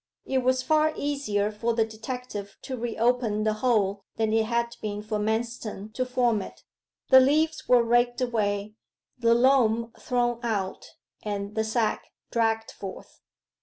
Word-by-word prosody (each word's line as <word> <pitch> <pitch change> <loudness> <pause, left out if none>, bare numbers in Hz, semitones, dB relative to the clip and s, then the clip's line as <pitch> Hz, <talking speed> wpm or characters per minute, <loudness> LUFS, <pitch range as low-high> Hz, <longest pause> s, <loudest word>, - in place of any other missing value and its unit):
It 265 - +1
was 255 0 +1
far 310 +2 +3
easier 215 -8 -1
for 230 +2 -1
the 225 -1 +3
detective 220 -2 -7
to 265 - -4
re 235 -1 -4
open 230 -3 +1
the 215 0 +2
hole 205 -5 +1
than 220 -1 0
it 225 0 +3
had 235 0 -1
been 210 -1 -4
for 215 0 -2
Manston 220 -1 -3
to 255 +2 -1
form 245 -4 +1
it. - - -10 0.5
The 260 - +10
leaves 310 +4 +2
were 245 -1 +5
raked 240 +1 +2
away, 210 -4 -1 0.5
the 230 -1 +4
loam 235 -3 +3
thrown 240 -1 0
out, 205 -6 -3 0.3
and 205 -1 -4
the 220 - 0
sack 220 0 0 0.3
dragged 225 -1 0
forth. 195 -2 -10
230 Hz, 155 wpm, -26 LUFS, 215-250 Hz, 0.5 s, The